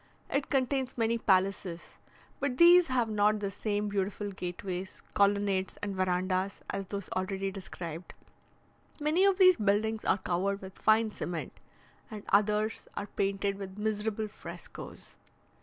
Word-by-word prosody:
It 275 0 0
contains 265 -1 0
many 230 0 +1
palaces; 190 -4 0 0.4
but 275 -3 -1
these 350 +1 +8
have 250 -3 +1
not 210 0 +2
the 200 -1 -2
same 205 +1 -2
beautiful 205 0 -2
gateways, 185 0 -5
colonnades, 200 -1 +2
and 200 -1 -2
verandahs 185 +1 0
as 195 -1 -4
those 200 0 -5
already 195 +1 -2
described. 175 -3 -7 0.8
Many 310 +6 +3
of 395 -2 +4
these 370 -2 +7
buildings 215 +2 +1
are - - +3
covered 190 +2 -1
with 190 -1 -11
fine 220 0 +4
cement, 175 -5 -5 0.5
and 215 -3 -7
others 210 +2 +2
are - - -2
painted 195 0 -1
with 190 0 -7
miserable 215 0 -1
frescoes. 210 - -10
205 Hz, 135 wpm, -30 LUFS, 190-220 Hz, 0.8 s, these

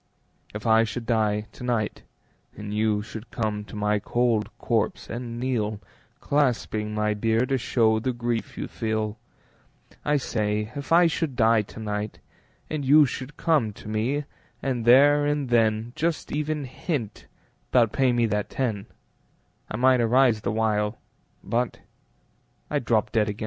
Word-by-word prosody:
If 105 - -6
I 110 0 +5
should 115 +1 -4
die 110 -3 +1
to - - -11
night 120 -4 -1 0.6
And 105 0 -6
you 105 -1 +1
should 110 +1 -9
come 105 -3 -2
to 105 - -11
my 105 0 +1
cold 115 0 +1
corpse - - -1
and 120 0 -5
kneel, 110 -5 -1 0.4
Clasping 115 -6 0
my 105 0 +1
bier 115 +3 +1
to 135 0 0
show 110 -2 +2
the 130 +4 -1
grief 120 -1 -3
you - - -3
feel, 110 -1 -2 0.8
I 150 0 +2
say, 105 -4 -1
if 140 +1 -6
I 175 +1 +7
should 160 -4 -1
die 115 -1 +4
to 105 - -11
night 105 -1 -3 0.5
And 155 -2 -3
you 145 +3 +7
should 130 +3 -6
come 145 -11 +1
to - - -12
me, 115 +7 -1 0.4
and 125 -4 -2
there 145 +4 +6
and 145 -3 -1
then 115 0 +2
Just 165 -1 -2
even 150 0 -1
hint 130 - -4 0.4
'bout 115 -4 +4
payin' 130 -2 +2
me 120 -1 +3
that 105 -1 -1
ten, 110 -7 -2 0.8
I 110 - -4
might 130 0 +4
arise 120 -1 +3
the - - -1
while, 105 -1 0 0.5
But 120 0 -1 0.9
I'd - - -1
drop - - +1
dead 110 -1 +2
again. 105 +2 -5
115 Hz, 155 wpm, -25 LUFS, 105-130 Hz, 0.9 s, I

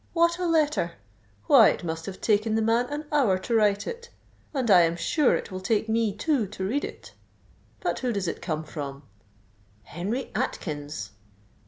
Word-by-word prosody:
what 340 +1 +3
a 360 - 0
letter. 300 - +1 0.5
Why, - - +7
it - - -3
must 165 -1 -4
have 195 - -7
taken 215 0 +2
the 225 - +2
man 230 +2 +2
an 295 +1 -4
hour 255 -11 +3
to 190 +5 -4
write 205 -2 +3
it; 475 0 -7 0.4
and 255 -7 0
I 180 -2 +8
am 165 0 +2
sure 290 - +2
it - - -5
will 185 - -4
take 210 +3 0
me 225 -1 +1
two 230 +2 0
to 190 -1 -5
read 280 +8 -1
it. - - -8 0.7
But - - -1
who 250 -2 -1
does 200 -5 -2
it - - -4
come 160 -2 -3
from? 145 -2 -7 0.9
_Henry 205 - -3
Atkins! 150 - -4
215 Hz, 180 wpm, -26 LUFS, 175-265 Hz, 0.9 s, I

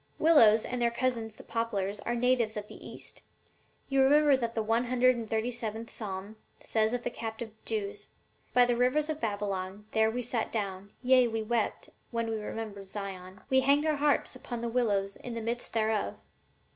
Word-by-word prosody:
Willows 230 -10 +6
and 250 -1 -3
their 235 - +4
cousins 235 -3 -2
the - - -12
poplars 210 -3 -2
are 240 - -2
natives 240 -3 +2
of 210 0 -5
the - - -11
East; - - -11 0.7
you 270 -1 +3
remember 290 +1 +6
that 235 -3 -2
the 220 - 0
one 225 +3 +1
hundred 255 +1 +4
and 230 -2 -5
thirty 225 +2 0
seventh 225 -1 -5
psalm 200 0 -6 0.2
says 220 0 +1
of 245 0 -2
the - - -2
captive 225 -1 -5
Jews, 205 -2 -3 0.4
'By 250 0 +6
the 245 0 +1
rivers 275 +6 +2
of 310 - -6
Babylon, 200 -2 -3
there 220 0 +3
we 245 +2 -3
sat 235 -1 -2
down, 200 -2 -3
yea, 255 -1 +5
we 225 -1 -2
wept, 230 0 -1 0.2
when 230 -1 -2
we 220 - -2
remembered 210 -3 -6
Zion. 190 -2 -7
We 265 - +6
hanged 280 +3 +3
our 310 -2 +2
harps 290 -2 +1
upon 245 -2 -6
the 235 - -2
willows 205 -5 0
in 240 -1 -7
the - - -2
midst 235 +2 -3
thereof.' 220 -2 0
230 Hz, 190 wpm, -30 LUFS, 210-250 Hz, 0.7 s, Willows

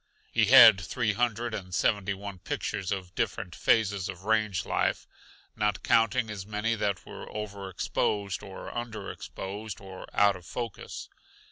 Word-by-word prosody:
He 110 - +4
had 115 -4 +9
three 105 +3 -1
hundred 120 +1 0
and 90 -4 -4
seventy 100 -1 +1
one 100 -1 -7
pictures 95 +1 -3
of 95 -2 -3
different - - -2
phases 100 -4 +2
of 95 -1 -7
range 110 -2 +1
life, - - 0 0.5
not 105 -3 0
counting 115 +1 +3
as 100 -3 -5
many 105 +3 -1
that 105 -3 -1
were - - -9
over 100 -2 -5
exposed 100 +2 -1
or 95 -2 -8
under 115 -4 -4
exposed 100 +1 -7
or 95 -1 -10
out 100 -1 +4
of 90 - -11
focus. 120 -4 -6
105 Hz, 150 wpm, -29 LUFS, 95-110 Hz, 0.5 s, had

